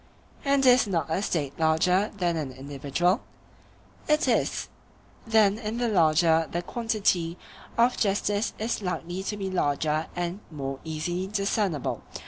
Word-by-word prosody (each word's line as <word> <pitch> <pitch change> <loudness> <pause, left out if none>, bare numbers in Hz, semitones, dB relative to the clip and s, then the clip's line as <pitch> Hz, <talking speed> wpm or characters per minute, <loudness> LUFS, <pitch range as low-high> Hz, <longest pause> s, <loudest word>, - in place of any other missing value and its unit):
And 275 -1 +2
is 250 -2 +6
not 165 -6 -1
a 175 - +1
State 150 -8 -2
larger 180 +6 +3
than 175 -3 +1
an 150 -5 -3
individual? 140 - -1 0.9
It 300 0 +3
is. - - +1 0.6
Then 215 -2 +4
in 220 0 -4
the 240 0 0
larger 165 -3 +4
the 175 +1 -2
quantity 195 -6 0 0.4
of 240 +2 +3
justice 205 +1 0
is 220 +1 -2
likely 180 -1 -3
to 205 +2 -4
be 195 -1 -3
larger 155 -2 0
and 175 +2 -3
more 135 -3 -5
easily 175 +4 -3
discernible. 200 - -1
180 Hz, 135 wpm, -27 LUFS, 160-210 Hz, 0.9 s, is